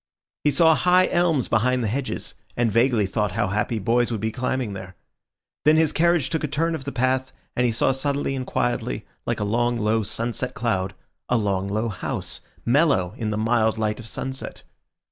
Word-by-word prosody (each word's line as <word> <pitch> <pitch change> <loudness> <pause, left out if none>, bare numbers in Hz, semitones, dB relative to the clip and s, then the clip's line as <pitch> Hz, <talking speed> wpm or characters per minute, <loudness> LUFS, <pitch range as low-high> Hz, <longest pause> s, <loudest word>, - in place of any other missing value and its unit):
He 150 - +4
saw 160 +3 +5
high 180 +3 +4
elms 170 -7 +2
behind 125 +2 +2
the - - 0
hedges, 130 +5 -3 0.2
and 120 -2 +2
vaguely 115 -1 +3
thought 105 0 -1
how 115 -1 0
happy 105 +3 0
boys 120 +4 +1
would 110 - -1
be 110 +2 -1
climbing 125 -2 -2
there. 95 -1 -8 0.7
Then 155 +3 +5
his 160 -1 +4
carriage 170 -4 +2
took 160 - -1
a - - +1
turn 165 +4 0
of 150 -5 -5
the 140 - -3
path, 130 +1 0 0.2
and 125 0 +2
he - - +1
saw 115 - +2
suddenly 140 +1 -1
and 130 -1 -4
quietly, 65 - -1 0.2
like - - 0
a - - 0
long, 120 +3 +1
low, 110 0 +1
sunset 120 +4 -2
cloud, 95 -5 -1 0.3
a 125 - +3
long, 100 -3 0
low 110 +3 -1
house, 100 - -4 0.2
mellow 120 - +3
in 110 - -2
the 105 - -1
mild 110 0 +2
light 110 0 -1
of 115 - -8
sunset. 130 +4 -5
120 Hz, 195 wpm, -24 LUFS, 110-135 Hz, 0.7 s, saw